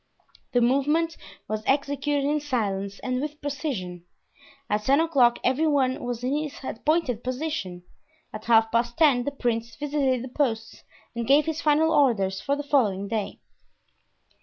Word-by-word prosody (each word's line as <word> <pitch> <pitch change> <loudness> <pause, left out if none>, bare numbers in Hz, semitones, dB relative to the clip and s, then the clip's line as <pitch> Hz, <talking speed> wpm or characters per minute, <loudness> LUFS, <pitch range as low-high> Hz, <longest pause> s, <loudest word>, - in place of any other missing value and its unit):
The 245 - +3
movement 295 +7 +2 0.3
was 215 0 -3
executed 285 +1 0
in 300 +1 +1
silence 200 -8 -2
and 255 0 -2
with 300 +1 -5
precision. 255 - -4 0.6
At 210 0 0
ten 275 +2 +4
o'clock 270 -8 +3
every 265 +5 +2
one 265 -4 +1
was 245 -1 -4
in 260 +3 0
his 300 -1 -3
appointed 260 -2 -1
position; 255 - -4 0.5
at 215 - -8
half 225 -1 +4
past 235 +1 0
ten 275 -6 +4
the 285 - -1
prince 230 -4 -2
visited 280 -4 0
the 260 - -7
posts 245 -4 -2 0.3
and 235 -1 -3
gave 290 +2 +5
his 320 0 -3
final 310 +1 +3
orders 215 -11 +2
for 280 - 0
the 290 - -4
following 205 -9 +1
day. 215 -2 -3
260 Hz, 155 wpm, -25 LUFS, 230-290 Hz, 0.6 s, gave